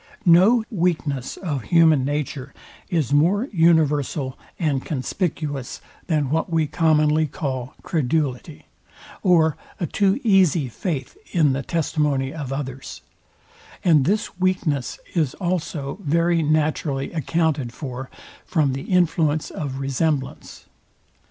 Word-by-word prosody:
No 190 Hz, +7 st, +6 dB
weakness 160 Hz, -, -1 dB
of 145 Hz, -, -4 dB
human 160 Hz, -5 st, +4 dB
nature 140 Hz, -1 st, -3 dB, 0.3 s
is 155 Hz, -7 st, 0 dB
more 180 Hz, -, +3 dB
universal 150 Hz, -5 st, +2 dB, 0.2 s
and 145 Hz, -6 st, 0 dB
conspicuous 145 Hz, -2 st, -3 dB, 0.3 s
than 150 Hz, -5 st, 0 dB
what 160 Hz, +3 st, 0 dB
we 160 Hz, -1 st, +2 dB
commonly 155 Hz, 0 st, +2 dB
call 130 Hz, -3 st, -4 dB
CREDULITY, 150 Hz, -2 st, -2 dB, 0.6 s
or 165 Hz, -5 st, +3 dB, 0.2 s
a 175 Hz, -, 0 dB
too 195 Hz, -, +1 dB
easy 185 Hz, -, +3 dB
faith 155 Hz, -, -4 dB, 0.2 s
in 155 Hz, -7 st, +3 dB
the 135 Hz, -, -2 dB
testimony 150 Hz, -4 st, -1 dB
of 145 Hz, -5 st, -5 dB
others; 135 Hz, -1 st, -6 dB, 0.8 s
and 155 Hz, -6 st, +5 dB
this 200 Hz, -1 st, -1 dB
weakness 175 Hz, -8 st, 0 dB, 0.2 s
is 155 Hz, -7 st, 0 dB
also 175 Hz, -4 st, -3 dB
very 170 Hz, +1 st, +2 dB
naturally 150 Hz, -2 st, 0 dB
accounted 155 Hz, -4 st, 0 dB
for 130 Hz, -1 st, -7 dB, 0.3 s
from 150 Hz, -6 st, +1 dB
the 135 Hz, +1 st, -5 dB
influence 165 Hz, -4 st, +1 dB
of 140 Hz, -4 st, -4 dB
resemblance. 135 Hz, 0 st, -2 dB
155 Hz, 115 wpm, -22 LUFS, 140-170 Hz, 0.8 s, No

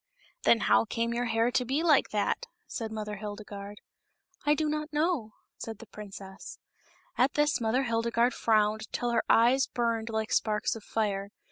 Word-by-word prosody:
Then 230 Hz, -, +5 dB
how -, -, +4 dB
came 230 Hz, +1 st, -1 dB
your 240 Hz, +1 st, -1 dB
hair 230 Hz, +1 st, +1 dB
to 250 Hz, -, +2 dB
be 270 Hz, +6 st, 0 dB
like 310 Hz, -5 st, +4 dB
that?" 215 Hz, -, -1 dB, 0.2 s
said 225 Hz, -2 st, -5 dB
Mother 210 Hz, -1 st, -4 dB
Hildegarde. 205 Hz, 0 st, -7 dB, 0.7 s
I 295 Hz, -, +5 dB
do 310 Hz, 0 st, 0 dB
not 305 Hz, 0 st, -2 dB
know," 300 Hz, -8 st, 0 dB, 0.3 s
said 225 Hz, -2 st, -6 dB
the 230 Hz, -, -11 dB
princess. 195 Hz, -2 st, -10 dB, 0.6 s
At 255 Hz, +3 st, +3 dB
this 295 Hz, -3 st, +2 dB
Mother 235 Hz, +4 st, +1 dB
Hildegarde 235 Hz, 0 st, +1 dB
frowned 215 Hz, -1 st, +1 dB
till 240 Hz, 0 st, -1 dB
her 235 Hz, -, +2 dB
eyes 245 Hz, +4 st, +5 dB
burned 230 Hz, -2 st, -1 dB
like 220 Hz, -1 st, -2 dB
sparks 210 Hz, 0 st, +1 dB
of 225 Hz, -, -9 dB
fire. 200 Hz, -3 st, -1 dB
230 Hz, 165 wpm, -29 LUFS, 215-250 Hz, 0.7 s, Then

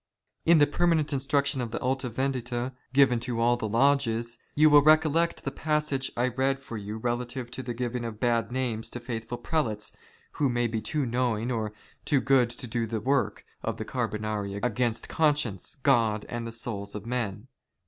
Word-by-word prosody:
In 170 Hz, 0 st, +7 dB
the 145 Hz, -, +6 dB
permanent 155 Hz, 0 st, +1 dB
instruction 140 Hz, 0 st, +1 dB
of 120 Hz, -, -3 dB
the 110 Hz, -, -3 dB
Alta 130 Hz, 0 st, -1 dB
Vendita, 125 Hz, 0 st, -2 dB, 0.2 s
given 130 Hz, -3 st, +5 dB
to 120 Hz, -1 st, -3 dB
all 120 Hz, +1 st, +4 dB
the 110 Hz, -3 st, -3 dB
lodges, 120 Hz, -1 st, +2 dB, 0.2 s
ycu 155 Hz, -, +6 dB
will 145 Hz, 0 st, +9 dB
recollect 155 Hz, +2 st, +3 dB
the -, -, -2 dB
passage 150 Hz, -3 st, -1 dB
I 120 Hz, +1 st, +2 dB
read 135 Hz, +2 st, +1 dB
for 135 Hz, -4 st, -9 dB
you 105 Hz, 0 st, -5 dB
relative 120 Hz, +1 st, -3 dB
to 130 Hz, -, -5 dB
the 120 Hz, -2 st, -5 dB
giving 120 Hz, 0 st, -2 dB
of 115 Hz, -2 st, -5 dB
bad 115 Hz, -2 st, +1 dB
names 120 Hz, -4 st, -2 dB
to 120 Hz, -, -6 dB
faithful 115 Hz, -1 st, -5 dB
Prelates 115 Hz, -11 st, -2 dB, 0.4 s
who 140 Hz, -, +1 dB
may 120 Hz, 0 st, +1 dB
be 110 Hz, -1 st, -1 dB
too 145 Hz, +6 st, -1 dB
knowing 120 Hz, -1 st, 0 dB
or 110 Hz, -3 st, -1 dB, 0.3 s
too 145 Hz, -3 st, +2 dB
good 130 Hz, -2 st, +3 dB
to 120 Hz, +1 st, -7 dB
do 115 Hz, 0 st, -2 dB
the 110 Hz, 0 st, -2 dB
work 135 Hz, +5 st, 0 dB, 0.2 s
of -, -, -3 dB
the -, -, -4 dB
Car])onari 105 Hz, -2 st, -2 dB
against 120 Hz, -1 st, 0 dB
conscience, 145 Hz, -, 0 dB
God, 115 Hz, -6 st, +3 dB
and 120 Hz, -1 st, -4 dB
the -, -, -5 dB
souls 105 Hz, -3 st, -4 dB
of 105 Hz, 0 st, -6 dB
men. 115 Hz, -2 st, -3 dB
120 Hz, 185 wpm, -28 LUFS, 115-135 Hz, 0.4 s, will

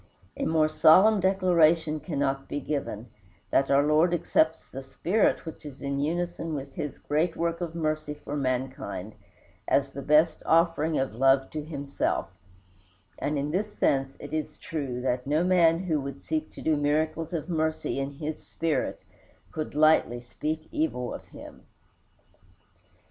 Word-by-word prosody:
A -, -, -2 dB
more 160 Hz, -1 st, +3 dB
solemn 185 Hz, +7 st, +6 dB
declaration 170 Hz, -5 st, +3 dB
cannot 140 Hz, -3 st, -2 dB
be 145 Hz, -, -2 dB
given, 125 Hz, -7 st, -4 dB, 0.4 s
that 135 Hz, -, +3 dB
our 140 Hz, +1 st, +5 dB
Lord 155 Hz, +4 st, +3 dB
accepts 160 Hz, -1 st, +1 dB
the 135 Hz, -, -7 dB
spirit 175 Hz, +12 st, 0 dB
which 160 Hz, -, -8 dB
is 145 Hz, -3 st, -9 dB
in 140 Hz, 0 st, -2 dB
unison 165 Hz, +1 st, -2 dB
with 135 Hz, -1 st, -6 dB
his 150 Hz, -2 st, -5 dB
great 160 Hz, +3 st, 0 dB
work 170 Hz, +1 st, -1 dB
of 165 Hz, -1 st, -4 dB
mercy 155 Hz, -2 st, -2 dB
for 145 Hz, 0 st, -7 dB
mankind, 130 Hz, -7 st, -3 dB, 0.5 s
as 140 Hz, 0 st, +2 dB
the 140 Hz, -, -6 dB
best 150 Hz, +4 st, +3 dB
offering 165 Hz, -1 st, +2 dB
of 135 Hz, -4 st, -1 dB
love 135 Hz, +2 st, +3 dB
to 155 Hz, -1 st, -4 dB
himself; 140 Hz, -9 st, -2 dB, 0.9 s
and 150 Hz, +1 st, -1 dB
in 145 Hz, +1 st, -2 dB
this 205 Hz, +5 st, -2 dB
sense 135 Hz, -1 st, +1 dB
it -, -, -9 dB
is 155 Hz, -1 st, -3 dB
true 140 Hz, -9 st, -4 dB
that 125 Hz, 0 st, -1 dB
no 150 Hz, +4 st, +2 dB
man 175 Hz, -2 st, +4 dB
who 160 Hz, -6 st, 0 dB
would 140 Hz, 0 st, -7 dB
seek 155 Hz, 0 st, -2 dB
to -, -, -10 dB
do 160 Hz, -, +2 dB
miracles 155 Hz, +3 st, 0 dB
of 165 Hz, -3 st, -3 dB
mercy 160 Hz, -4 st, -1 dB
in 135 Hz, +1 st, -3 dB
His 155 Hz, +2 st, -5 dB
spirit 160 Hz, -5 st, -2 dB, 0.5 s
could 155 Hz, -2 st, -5 dB
lightly 155 Hz, -5 st, +4 dB
speak 155 Hz, +6 st, -4 dB
evil 125 Hz, -5 st, -1 dB
of -, -, -8 dB
him. -, -, -13 dB
155 Hz, 155 wpm, -27 LUFS, 140-165 Hz, 0.9 s, solemn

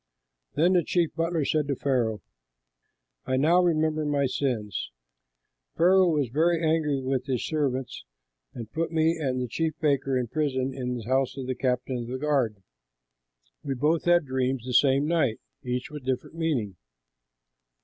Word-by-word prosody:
Then 170 Hz, +5 st, +3 dB
the 175 Hz, -2 st, +3 dB
chief 170 Hz, +1 st, 0 dB
butler 165 Hz, -2 st, -1 dB
said 150 Hz, -1 st, 0 dB
to 140 Hz, -, 0 dB
Pharaoh, 115 Hz, -, -1 dB, 1.0 s
"I 130 Hz, -, +1 dB
now 165 Hz, +6 st, +4 dB
remember 155 Hz, -3 st, +1 dB
my 145 Hz, -2 st, +1 dB
sins: 125 Hz, -6 st, -2 dB, 0.9 s
Pharaoh 185 Hz, +1 st, +5 dB
was 145 Hz, -6 st, 0 dB
very 165 Hz, +6 st, +2 dB
angry 155 Hz, -4 st, +1 dB
with 130 Hz, 0 st, -1 dB
his 130 Hz, -3 st, -1 dB
servants 135 Hz, -5 st, -2 dB, 0.5 s
and 115 Hz, -3 st, -8 dB
put 165 Hz, +1 st, -2 dB
me 160 Hz, 0 st, +2 dB
and 130 Hz, -3 st, -1 dB
the 125 Hz, -, -2 dB
chief 160 Hz, +5 st, -1 dB
baker 135 Hz, -3 st, +1 dB
in 125 Hz, -, 0 dB
prison 130 Hz, -1 st, -1 dB
in 125 Hz, -2 st, -3 dB
the 115 Hz, -, -7 dB
house 130 Hz, +2 st, 0 dB
of 135 Hz, -, -4 dB
the 130 Hz, -, -1 dB
captain 125 Hz, 0 st, -1 dB
of 120 Hz, -, -5 dB
the 130 Hz, +2 st, -4 dB
guard. 130 Hz, -9 st, 0 dB, 1.0 s
We 135 Hz, -, -2 dB
both 150 Hz, +5 st, +1 dB
had 175 Hz, -2 st, +4 dB
dreams 130 Hz, -1 st, -1 dB
the 125 Hz, -, -4 dB
same 135 Hz, +2 st, +4 dB
night, 155 Hz, -8 st, +1 dB, 0.2 s
each 125 Hz, +3 st, -3 dB
with 150 Hz, -1 st, -7 dB
a -, -, -19 dB
different 130 Hz, +4 st, -2 dB
meaning. 130 Hz, -, -1 dB
135 Hz, 165 wpm, -26 LUFS, 125-160 Hz, 1.0 s, Pharaoh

